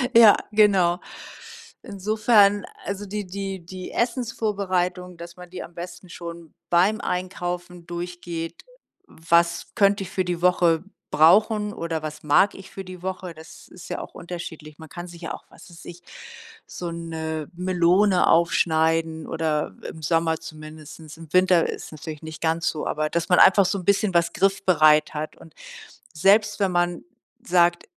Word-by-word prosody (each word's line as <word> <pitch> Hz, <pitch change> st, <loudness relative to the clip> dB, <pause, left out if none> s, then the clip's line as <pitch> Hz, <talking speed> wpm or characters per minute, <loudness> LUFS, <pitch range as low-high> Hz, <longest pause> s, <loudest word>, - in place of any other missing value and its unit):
Ja, 225 Hz, -3 st, +9 dB
genau. 195 Hz, -4 st, +4 dB, 0.8 s
Insofern, 205 Hz, 0 st, +3 dB, 0.2 s
also, 200 Hz, +1 st, -4 dB
die 205 Hz, +1 st, -4 dB
die 195 Hz, -2 st, -6 dB
die 185 Hz, +1 st, -8 dB
Essensvorbereitung, 200 Hz, -7 st, -2 dB
dass 170 Hz, +1 st, -10 dB
man 180 Hz, -1 st, -11 dB
die 180 Hz, 0 st, -7 dB
am 175 Hz, -, -13 dB
besten 175 Hz, +1 st, -9 dB
schon 170 Hz, -1 st, -9 dB, 0.2 s
beim 190 Hz, +6 st, +3 dB
Einkaufen 180 Hz, -1 st, -4 dB
durchgeht, 175 Hz, -1 st, -6 dB, 0.5 s
„was 170 Hz, +1 st, +1 dB
könnte 200 Hz, -1 st, +3 dB
ich 185 Hz, -, -9 dB
für 190 Hz, -1 st, -1 dB
die 175 Hz, -1 st, -3 dB
Woche 175 Hz, -2 st, +3 dB, 0.3 s
brauchen” 210 Hz, +6 st, +4 dB
oder 165 Hz, -5 st, -4 dB
„was 155 Hz, 0 st, -7 dB
mag 155 Hz, +7 st, +4 dB
ich 190 Hz, -, -12 dB
für 195 Hz, -, -7 dB
die 180 Hz, -1 st, -10 dB
Woche”, 185 Hz, -1 st, -5 dB
das 160 Hz, 0 st, -14 dB
ist -, -, -12 dB
ja -, -, -3 dB
auch -, -, -10 dB
unterschiedlich. 160 Hz, -3 st, -8 dB
Man 160 Hz, -, -11 dB
kann 175 Hz, +3 st, -8 dB
sich 170 Hz, 0 st, -12 dB
ja -, -, -4 dB
auch, -, -, -10 dB
was -, -, -16 dB
weiß 170 Hz, 0 st, -14 dB
ich, 175 Hz, 0 st, -10 dB, 0.7 s
so 175 Hz, -1 st, -6 dB
'ne 160 Hz, -2 st, -5 dB
Melone 180 Hz, +2 st, +3 dB
aufschneiden 160 Hz, -1 st, +2 dB
oder 155 Hz, -2 st, -2 dB
im 160 Hz, -, -10 dB
Sommer 165 Hz, 0 st, +1 dB
zumindest. 155 Hz, 0 st, -11 dB
Im 165 Hz, -2 st, -13 dB
Winter 185 Hz, -2 st, +4 dB
ist -, -, -6 dB
es -, -, -12 dB
natürlich 155 Hz, 0 st, -8 dB
nicht 160 Hz, 0 st, -9 dB
ganz 165 Hz, +1 st, 0 dB
so, 155 Hz, -, -4 dB
aber 155 Hz, 0 st, -1 dB
dass 170 Hz, +1 st, -2 dB
man 180 Hz, -, +5 dB
einfach 195 Hz, 0 st, +7 dB
so 200 Hz, +2 st, 0 dB
'n 175 Hz, -, -10 dB
bisschen 200 Hz, -1 st, +2 dB
was 170 Hz, -1 st, +2 dB
griffbereit 170 Hz, -6 st, +3 dB
hat 155 Hz, +1 st, -5 dB
und 165 Hz, -, -16 dB, 0.6 s
selbst 205 Hz, +5 st, +3 dB
wenn 195 Hz, -2 st, +1 dB
man 175 Hz, -1 st, 0 dB, 0.4 s
sagt 175 Hz, -1 st, +2 dB
175 Hz, 160 wpm, -24 LUFS, 165-190 Hz, 0.8 s, Ja